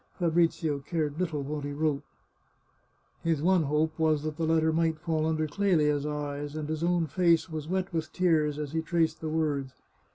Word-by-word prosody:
Fabrizio 165 Hz, -3 st, +1 dB
cared 150 Hz, +1 st, -2 dB
little 160 Hz, -6 st, -1 dB
what 145 Hz, +1 st, -4 dB
he 145 Hz, -, -3 dB
wrote. 150 Hz, -1 st, 0 dB, 1.2 s
His 165 Hz, -3 st, +1 dB
one 185 Hz, 0 st, +4 dB
hope 155 Hz, +2 st, 0 dB
was 155 Hz, -2 st, +2 dB
that 155 Hz, -1 st, -3 dB
the 160 Hz, 0 st, -1 dB
letter 160 Hz, 0 st, +3 dB
might 165 Hz, -1 st, +1 dB
fall 160 Hz, -1 st, -1 dB
under 155 Hz, -1 st, 0 dB
Clelia's 150 Hz, -5 st, +1 dB
eyes, 145 Hz, 0 st, -4 dB
and 155 Hz, -1 st, -3 dB
his 155 Hz, +1 st, -3 dB
own 175 Hz, -1 st, +2 dB
face 165 Hz, +1 st, +2 dB
was 155 Hz, -1 st, -5 dB
wet 185 Hz, +1 st, -2 dB
with 160 Hz, -1 st, -2 dB
tears 155 Hz, -5 st, +2 dB
as 150 Hz, -2 st, -4 dB
he 160 Hz, 0 st, 0 dB
traced 165 Hz, 0 st, 0 dB
the 160 Hz, -, -3 dB
words. 145 Hz, -4 st, -1 dB
155 Hz, 185 wpm, -28 LUFS, 150-165 Hz, 1.2 s, one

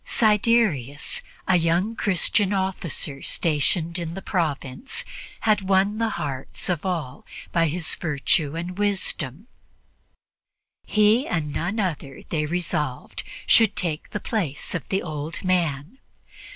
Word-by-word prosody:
Siderius, 210 Hz, -, +2 dB, 0.3 s
a 185 Hz, -, +5 dB
young 175 Hz, +6 st, +1 dB
Christian 200 Hz, +1 st, +2 dB
officer 180 Hz, -7 st, -2 dB
stationed 165 Hz, +2 st, 0 dB
in 170 Hz, -1 st, -4 dB
the 195 Hz, -, -5 dB
province, 170 Hz, -, -2 dB, 0.4 s
had 215 Hz, -2 st, +3 dB
won 195 Hz, +2 st, +2 dB
the 225 Hz, -1 st, +2 dB
hearts 135 Hz, +4 st, -3 dB
of 175 Hz, -4 st, 0 dB
all 170 Hz, -9 st, -3 dB, 0.3 s
by 170 Hz, -1 st, +3 dB
his 165 Hz, +1 st, -1 dB
virtue 150 Hz, -1 st, +1 dB
and 175 Hz, +3 st, -4 dB
wisdom; 190 Hz, -, 0 dB, 1.4 s
he, 215 Hz, +5 st, +4 dB
and 150 Hz, -4 st, -1 dB
none 185 Hz, +7 st, -1 dB
other, 155 Hz, -8 st, -3 dB
they 150 Hz, -2 st, 0 dB
resolved, 150 Hz, -5 st, -2 dB, 0.2 s
should 220 Hz, -3 st, +5 dB
take 160 Hz, -4 st, -2 dB
the 210 Hz, -, -3 dB
place 175 Hz, -13 st, -2 dB
of 180 Hz, -, -4 dB
the 190 Hz, -, 0 dB
old 155 Hz, +1 st, -5 dB
man. 175 Hz, -, 0 dB
175 Hz, 125 wpm, -24 LUFS, 150-200 Hz, 1.4 s, a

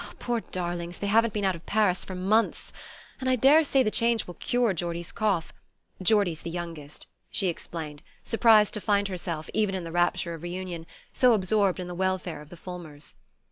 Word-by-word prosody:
Poor 240 Hz, -1 st, -1 dB
darlings, 175 Hz, -2 st, -4 dB
they -, -, -4 dB
haven't 225 Hz, +3 st, +3 dB
been 205 Hz, -1 st, -1 dB
out 190 Hz, -, +2 dB
of 165 Hz, -, -13 dB
Paris 205 Hz, -4 st, +2 dB
for 185 Hz, -, -7 dB
months! 205 Hz, +5 st, +1 dB, 0.5 s
And 260 Hz, -1 st, -1 dB
I 255 Hz, -, +4 dB
daresay 275 Hz, +2 st, +5 dB
the 215 Hz, -, 0 dB
change 230 Hz, 0 st, +2 dB
will 175 Hz, -, -8 dB
cure 240 Hz, +2 st, +1 dB
Geordie's 170 Hz, 0 st, -3 dB
cough 200 Hz, -6 st, -1 dB, 0.5 s
Geordie's 185 Hz, -4 st, +2 dB
the -, -, -5 dB
youngest," 165 Hz, -4 st, -7 dB, 0.2 s
she 190 Hz, -, +1 dB
explained, 160 Hz, -3 st, -6 dB, 0.2 s
surprised 220 Hz, -2 st, +4 dB
to 210 Hz, -, -2 dB
find 200 Hz, -1 st, +1 dB
herself, 170 Hz, -4 st, -4 dB
even 210 Hz, -3 st, +1 dB
in 185 Hz, -, -3 dB
the 165 Hz, -, -6 dB
rapture 175 Hz, 0 st, +1 dB
of 165 Hz, -, -8 dB
reunion, 175 Hz, -1 st, -5 dB, 0.3 s
so 250 Hz, -2 st, +5 dB
absorbed 195 Hz, -1 st, +2 dB
in 180 Hz, -, -4 dB
the 180 Hz, -, -6 dB
welfare 185 Hz, -3 st, -2 dB
of 150 Hz, -, -14 dB
the 175 Hz, -, -11 dB
Fulmers. 165 Hz, -5 st, -9 dB
185 Hz, 185 wpm, -27 LUFS, 170-215 Hz, 0.5 s, daresay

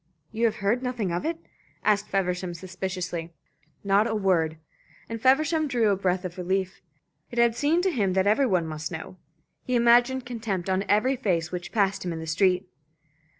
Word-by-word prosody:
"You 225 Hz, +1 st, 0 dB
have 225 Hz, -, +2 dB
heard 235 Hz, +5 st, +2 dB
nothing 245 Hz, -7 st, -2 dB
of 175 Hz, -, -2 dB
it?" 330 Hz, 0 st, -2 dB, 0.5 s
asked 210 Hz, -1 st, +2 dB
Feversham, 180 Hz, -2 st, -1 dB
suspiciously. 180 Hz, -2 st, -5 dB, 0.5 s
"Not 200 Hz, +2 st, +3 dB
a 220 Hz, -, -1 dB
word;" 170 Hz, -6 st, +1 dB, 0.5 s
and 230 Hz, -1 st, -6 dB
Feversham 305 Hz, +5 st, +3 dB
drew 235 Hz, -5 st, +2 dB
a 200 Hz, -, +3 dB
breath 185 Hz, -1 st, -1 dB
of 180 Hz, +1 st, -6 dB
relief. 190 Hz, +1 st, -2 dB, 0.5 s
It 240 Hz, -, -9 dB
had 235 Hz, -1 st, +4 dB
seemed 305 Hz, +7 st, +2 dB
to 380 Hz, -, +2 dB
him 200 Hz, -, 0 dB
that 190 Hz, 0 st, +2 dB
every 220 Hz, +7 st, +3 dB
one 180 Hz, -6 st, +1 dB
must 155 Hz, 0 st, -5 dB
know. 160 Hz, +2 st, -7 dB, 0.5 s
He 250 Hz, -, -1 dB
imagined 240 Hz, +2 st, +4 dB
contempt 215 Hz, -7 st, -3 dB
on 190 Hz, +1 st, 0 dB
every 250 Hz, +6 st, +3 dB
face 175 Hz, -8 st, -1 dB
which 180 Hz, -1 st, -5 dB
passed 200 Hz, -3 st, +1 dB
him 180 Hz, -, -3 dB
in 165 Hz, -, -4 dB
the 160 Hz, -, -6 dB
street. 180 Hz, +3 st, +1 dB
195 Hz, 185 wpm, -26 LUFS, 180-235 Hz, 0.5 s, had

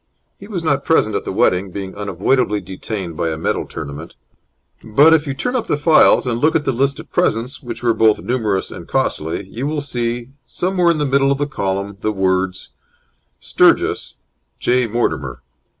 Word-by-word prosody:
He 200 Hz, -, -11 dB
was 185 Hz, -6 st, -4 dB
not 140 Hz, -4 st, +1 dB
present 110 Hz, -10 st, +2 dB
at -, -, -2 dB
the -, -, -3 dB
wedding, 95 Hz, +2 st, +1 dB
being 95 Hz, 0 st, -6 dB
unavoidably 105 Hz, +3 st, 0 dB
detained 95 Hz, -1 st, -6 dB
by 85 Hz, -, -1 dB
a 80 Hz, -, -3 dB
medal 80 Hz, -, -2 dB
tournament; 75 Hz, +1 st, -8 dB, 0.7 s
but, 145 Hz, +9 st, +5 dB
if 155 Hz, -1 st, +2 dB
you 135 Hz, -, -3 dB
turn 250 Hz, -, -2 dB
up 245 Hz, -, -1 dB
the -, -, +1 dB
files 155 Hz, -1 st, +5 dB
and 120 Hz, -2 st, -1 dB
look 155 Hz, +1 st, +3 dB
at 150 Hz, -, +1 dB
the -, -, +2 dB
list 135 Hz, +3 st, 0 dB
of -, -, -11 dB
presents, 115 Hz, +5 st, 0 dB
which 120 Hz, -2 st, -7 dB
were 120 Hz, -1 st, +3 dB
both 110 Hz, -2 st, +3 dB
numerous 110 Hz, -6 st, -1 dB
and -, -, -9 dB
costly, 80 Hz, +5 st, -1 dB
you 120 Hz, +8 st, -5 dB
will 150 Hz, 0 st, -2 dB
see 120 Hz, -3 st, -2 dB, 0.2 s
somewhere 180 Hz, -1 st, +1 dB
in 170 Hz, -, +2 dB
the 150 Hz, -, 0 dB
middle 135 Hz, 0 st, +2 dB
of 140 Hz, -, +1 dB
the 145 Hz, -, 0 dB
column, 100 Hz, -6 st, -3 dB
the 110 Hz, -, 0 dB
words: 95 Hz, -1 st, -1 dB, 0.7 s
STURGIS, -, -, +2 dB, 0.4 s
J. 125 Hz, 0 st, +1 dB
MORTIMER. 80 Hz, -, -2 dB
115 Hz, 185 wpm, -18 LUFS, 95-140 Hz, 0.7 s, but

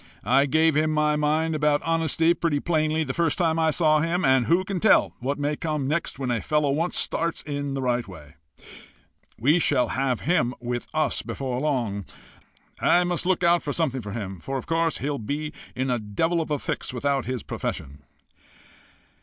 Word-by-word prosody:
I 135 Hz, +6 st, +4 dB
gave 160 Hz, +2 st, +3 dB
him 155 Hz, +1 st, +2 dB
my 150 Hz, -1 st, +2 dB
mind 155 Hz, +2 st, +1 dB
about 150 Hz, -1 st, +1 dB
honesty 165 Hz, 0 st, +2 dB
pretty 165 Hz, -4 st, 0 dB
plainly 155 Hz, 0 st, +1 dB
the 130 Hz, -3 st, -3 dB
first 165 Hz, -1 st, 0 dB
time 165 Hz, -2 st, +1 dB
I 160 Hz, -1 st, +3 dB
saw 155 Hz, -1 st, +3 dB
him. 165 Hz, +3 st, 0 dB
And 130 Hz, -3 st, +3 dB
who 175 Hz, +4 st, +3 dB
can 190 Hz, -1 st, -3 dB
tell 220 Hz, -, +4 dB
what 135 Hz, +3 st, -2 dB
may 145 Hz, +1 st, -1 dB
come 150 Hz, -3 st, -2 dB
next 155 Hz, +1 st, -1 dB
when 130 Hz, -2 st, -2 dB
a 115 Hz, -3 st, 0 dB
fellow 150 Hz, -2 st, +1 dB
once 165 Hz, +5 st, 0 dB
starts 165 Hz, 0 st, -1 dB
in 145 Hz, -2 st, -3 dB
the 135 Hz, -, -3 dB
right 120 Hz, -2 st, 0 dB
way! 75 Hz, -5 st, -12 dB, 1.0 s
We 145 Hz, +9 st, +3 dB
shall 140 Hz, -6 st, +2 dB
have 130 Hz, -3 st, -1 dB
him 150 Hz, -7 st, +1 dB
with 120 Hz, 0 st, -4 dB
us 155 Hz, 0 st, 0 dB
before 130 Hz, -2 st, -4 dB
long. 120 Hz, -9 st, -1 dB, 0.7 s
I 180 Hz, -, +4 dB
must 175 Hz, 0 st, -2 dB
look 185 Hz, -1 st, +1 dB
out 170 Hz, 0 st, +4 dB
for 145 Hz, -, -3 dB
something 135 Hz, -6 st, 0 dB
for 105 Hz, -2 st, -7 dB
him, 95 Hz, -5 st, -5 dB
for 135 Hz, +9 st, -4 dB
of 130 Hz, -, -6 dB
course 165 Hz, -1 st, 0 dB
he'll 145 Hz, 0 st, -3 dB
be 145 Hz, +7 st, -4 dB, 0.2 s
in 130 Hz, +1 st, -1 dB
a 120 Hz, -, 0 dB
devil 160 Hz, +12 st, 0 dB
of 160 Hz, -, -5 dB
a 150 Hz, -, 0 dB
fix -, -, -4 dB
without 135 Hz, +1 st, -1 dB
his 130 Hz, -4 st, -3 dB
profession." 70 Hz, +1 st, -5 dB
150 Hz, 195 wpm, -25 LUFS, 130-160 Hz, 1.0 s, I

